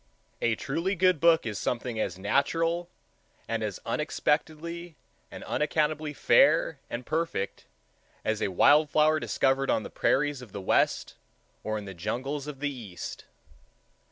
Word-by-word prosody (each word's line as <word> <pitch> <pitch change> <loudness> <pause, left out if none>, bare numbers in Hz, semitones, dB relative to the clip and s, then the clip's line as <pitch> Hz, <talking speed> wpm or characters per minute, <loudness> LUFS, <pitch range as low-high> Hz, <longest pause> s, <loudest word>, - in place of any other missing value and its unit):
A 115 -1 +2
truly 170 - -2
good 185 -2 +3
book 165 -2 +4
is 105 -3 -3
something 120 -1 -2
as 100 - -2
natural, 165 - 0 0.6
and 115 -1 -2
as 105 -3 -3
unexpectedly 160 +2 -2 0.3
and - - -9
unaccountably 150 0 0
fair 145 - +4
and 120 +1 -5
perfect, 160 -11 -2 0.6
as 110 -1 0
a - - +2
wild 145 - +5
flower 155 +1 +3
discovered 135 -2 +1
on 110 - +2
the - - -8
prairies 145 -1 +1
of 120 -6 -12
the 100 - -4
west 95 - +1 0.5
or 110 0 -2
in 105 - -6
the 95 - -7
jungles 130 - -3
of 145 -2 -7
the 145 -1 -1
east. 105 -9 -8
145 Hz, 145 wpm, -28 LUFS, 115-155 Hz, 0.6 s, wild